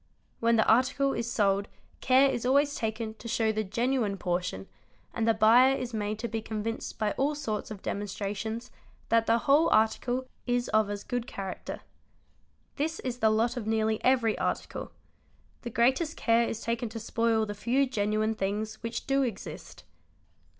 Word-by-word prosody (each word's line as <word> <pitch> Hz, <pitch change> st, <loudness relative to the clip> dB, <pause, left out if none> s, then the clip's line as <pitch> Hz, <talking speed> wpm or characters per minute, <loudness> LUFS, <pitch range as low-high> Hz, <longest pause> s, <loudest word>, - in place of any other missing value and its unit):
when 230 Hz, 0 st, +3 dB
the 220 Hz, -, +3 dB
article 260 Hz, +4 st, +3 dB
is 235 Hz, 0 st, -3 dB
sold 200 Hz, -3 st, +1 dB, 0.3 s
care 265 Hz, +2 st, +5 dB
is 240 Hz, -3 st, -2 dB
always 280 Hz, +3 st, +3 dB
taken 220 Hz, -1 st, -3 dB
to 225 Hz, -, -11 dB
show 225 Hz, -1 st, +1 dB
the 215 Hz, 0 st, -1 dB
genuine;: 230 Hz, 0 st, 0 dB
portion 175 Hz, -, -2 dB, 0.5 s
and 225 Hz, -1 st, -1 dB
the 225 Hz, -, +5 dB
buyer 240 Hz, +5 st, +6 dB
is 250 Hz, -2 st, -5 dB
made 210 Hz, -1 st, -2 dB
to 235 Hz, +2 st, -3 dB
be 225 Hz, -1 st, -3 dB
convinced 220 Hz, +1 st, -4 dB
by 215 Hz, -2 st, 0 dB
all 290 Hz, +3 st, +1 dB
sorts 225 Hz, -8 st, -3 dB
of 210 Hz, -3 st, -8 dB
demonstra 200 Hz, 0 st, -3 dB
_ -, -, -5 dB
tions 225 Hz, +3 st, -5 dB, 0.4 s
that 230 Hz, 0 st, +3 dB
the 230 Hz, -, +4 dB
whole 285 Hz, +6 st, +4 dB
article 245 Hz, +4 st, +1 dB, 0.2 s
is 245 Hz, 0 st, 0 dB
of 215 Hz, -1 st, +2 dB
as 205 Hz, 0 st, -4 dB
good 245 Hz, -1 st, -3 dB
character. 195 Hz, -1 st, -6 dB, 1.0 s
This 320 Hz, +3 st, -1 dB
is 250 Hz, -1 st, -4 dB
the 220 Hz, -, +4 dB
lot 225 Hz, +3 st, +1 dB
of 230 Hz, -4 st, -5 dB
nearly 220 Hz, 0 st, 0 dB
every 245 Hz, -4 st, +3 dB
article; -, -, -3 dB, 0.7 s
the 240 Hz, -, -5 dB
greatest 265 Hz, +8 st, +1 dB
care 230 Hz, 0 st, +2 dB
is 225 Hz, -, -5 dB
taken 230 Hz, 0 st, -2 dB
to 225 Hz, +1 st, -6 dB
spoil 230 Hz, 0 st, +1 dB
the 205 Hz, -, -5 dB
few 240 Hz, +7 st, +1 dB
genuine 215 Hz, -2 st, 0 dB
things 215 Hz, +2 st, -3 dB
which 230 Hz, 0 st, -4 dB
do 275 Hz, 0 st, +2 dB
exist. 235 Hz, -7 st, -5 dB
225 Hz, 175 wpm, -29 LUFS, 215-245 Hz, 1.0 s, buyer